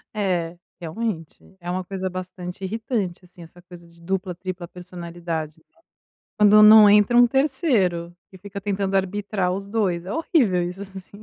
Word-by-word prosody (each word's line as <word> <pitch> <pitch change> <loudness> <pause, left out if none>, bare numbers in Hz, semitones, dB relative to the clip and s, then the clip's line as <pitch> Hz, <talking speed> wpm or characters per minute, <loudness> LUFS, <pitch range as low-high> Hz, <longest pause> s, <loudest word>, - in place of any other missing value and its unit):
É, 175 -5 -1 0.2
realmente, 175 0 -6
é 175 - -7
uma 185 +1 -2
coisa 190 0 -4
bastante 185 0 -7
irritante, 200 -3 -3
assim, 175 -1 -15
essa 170 +2 -16
coisa 175 -1 -14
de 170 0 -21
dupla, 190 +1 -3
tripla 185 -1 -6
personalidade, 170 -3 -7
né. 330 - -31 0.6
Quando 210 0 +7
não 210 -1 +9
entra 210 +3 +4
um 245 0 +7
terceiro, 235 - 0
que 190 - -15
fica 200 +1 -8
tentando 195 -1 -1
arbitrar 195 -1 -1
os 195 +1 -5
dois, 190 -5 -1
é 195 - -5
horrível 245 - +1
isso 180 +2 -9
assim. 195 +1 -11
190 Hz, 160 wpm, -23 LUFS, 175-205 Hz, 0.6 s, não